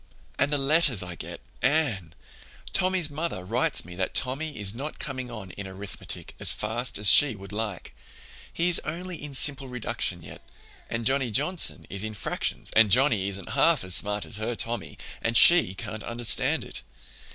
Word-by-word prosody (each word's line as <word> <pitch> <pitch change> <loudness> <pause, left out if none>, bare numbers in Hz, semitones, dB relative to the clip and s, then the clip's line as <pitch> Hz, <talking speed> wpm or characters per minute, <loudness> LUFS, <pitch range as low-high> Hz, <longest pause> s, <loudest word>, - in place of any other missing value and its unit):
"And 145 - +2
the 145 - +3
letters 140 - +3
I 90 -1 -7
get, - - -9 0.2
Anne! 125 - 0 0.6
Tommy's 185 -4 +2
mother 150 - -4
writes 115 +6 0
me 90 - -10
that 95 - -2
Tommy 140 +2 -1
is 100 -1 -3
not 140 +6 -6
coming 130 -3 -5
on 110 -6 -8
in 100 +1 -8
arithmetic 95 +1 -4
as - - +2
fast 115 +4 -2
as 105 0 +3
she 135 +3 +7
would 100 0 -11
like. 105 -3 -5 0.6
He 170 - +1
is 175 - +2
only 175 +2 -5
in 145 -2 -6
simple 140 0 +2
reduction 115 -7 -3
yet, 75 0 -11 0.5
and 115 0 -3
Johnny 135 0 +1
Johnson 150 - -1
is 100 +1 -5
in 110 0 -5
fractions, - - -3
and 115 -1 +6
Johnny 110 -4 +3
isn't 100 -1 -5
half 140 - +3
as 95 -1 -2
smart 105 +3 0
as - - -3
her 115 +2 -3
Tommy, 115 -1 -3 0.2
and 115 0 +2
she 170 - +7
can't 110 +1 -6
understand 120 0 +1
it. - - -5
115 Hz, 175 wpm, -26 LUFS, 100-145 Hz, 0.6 s, she